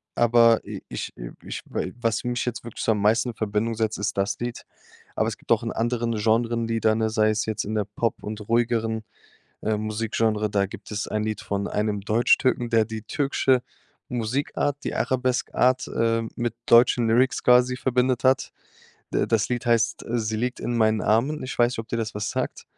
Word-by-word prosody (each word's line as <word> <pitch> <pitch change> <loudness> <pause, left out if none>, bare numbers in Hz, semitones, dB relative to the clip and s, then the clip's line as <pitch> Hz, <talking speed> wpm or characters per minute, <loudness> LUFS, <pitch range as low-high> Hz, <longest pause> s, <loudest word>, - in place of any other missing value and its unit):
aber 115 -1 +5
i - - -7
ich - - -5
i - - -7
ich - - -6
wa - - -3 0.2
was 115 +1 0
mich 125 -1 -2
jetzt 120 -2 -4
wirklich 115 -2 -7
so - - +3
am 105 -2 0
meisten 110 +4 +3
in 120 - -7
Verbindung 110 +2 -1
setzt, 110 -1 -1
ist 100 0 -2
das 100 +1 0
Lied. 120 0 -4 0.5
Aber - - +1
es - - -3
gibt - - -10
auch - - +4
in - - -2
anderen 120 0 -1
Genres, 115 +2 +1
die 115 0 -1
dann 110 0 +2
äh, 110 - +2
sei 110 0 +2
es 105 -1 0
jetzt 110 -1 -2
in 110 +2 -3
der 105 -1 0
Pop 105 +2 -2
und 105 0 -6
ruhigeren, 115 -1 +1 0.6
äh, 110 0 0
Musikgenre, 110 0 -1
da 100 -1 +1
gibt 100 - -11
es 105 0 -3
ein 110 0 -1
Lied 110 0 -3
von 100 0 -2
einem 105 -1 -1
Deutschtürken, 120 +3 +2
der 115 -2 +3
die 110 -1 -6
türkische 135 -1 +1 0.5
Musikart, 130 +4 -1
die - - -3
Arabesk-Art, 130 0 +1
ähm, 115 0 +1
mit 120 -1 -2
deutschen 120 0 +5
Lyrics 125 +4 +2
quasi 125 +1 +5
verbindet 125 -1 +1
hat. 130 0 +2 0.6
D - - +2
das 110 -2 +1
Lied 125 0 -2
heißt: 115 -1 +1
„Sie 110 -2 -1
liegt 125 +3 -2
in 120 - -2
meinen 110 -1 +3
Armen.“ 130 +8 +1
Ich 130 - -6
weiß 120 0 +4
nicht, - - -6
ob 115 +1 -5
dir 115 - -2
das 110 -2 -3
was 105 0 -2
sagt. - - -3
115 Hz, 205 wpm, -24 LUFS, 110-120 Hz, 0.6 s, aber